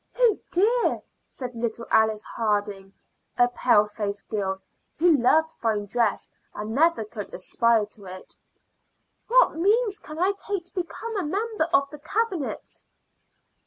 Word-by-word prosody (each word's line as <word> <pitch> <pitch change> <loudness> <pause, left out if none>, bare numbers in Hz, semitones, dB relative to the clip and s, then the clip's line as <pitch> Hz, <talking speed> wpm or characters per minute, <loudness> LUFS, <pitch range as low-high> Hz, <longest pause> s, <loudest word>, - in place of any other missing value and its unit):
"Oh 480 -4 +4
dear," 450 +7 +2 0.2
said 250 -2 -7
little 235 0 -3
Alice 220 -1 +3
Harding, 205 -3 -2 0.5
a 245 0 +5
pale 240 -3 +3
faced 205 -1 -5
girl, 190 -2 -2 0.4
who 335 0 +5
loved 315 +5 +3
fine 215 -3 0
dress 225 +1 -1 0.2
and 210 +1 -5
never 320 -2 +3
could 210 -1 -8
aspire 225 +4 +2
to 205 -1 -11
it, 185 0 -9 0.9
"what - - +5
means 415 +5 +2
can 305 -5 -10
I 370 +4 +3
take 395 -3 -4
to 360 - -13
become 400 +5 -4
a 385 - 0
member 410 +3 -1
of 300 -5 +2
the 300 - -9
Cabinet?" 370 -1 -3
250 Hz, 140 wpm, -25 LUFS, -, 0.9 s, a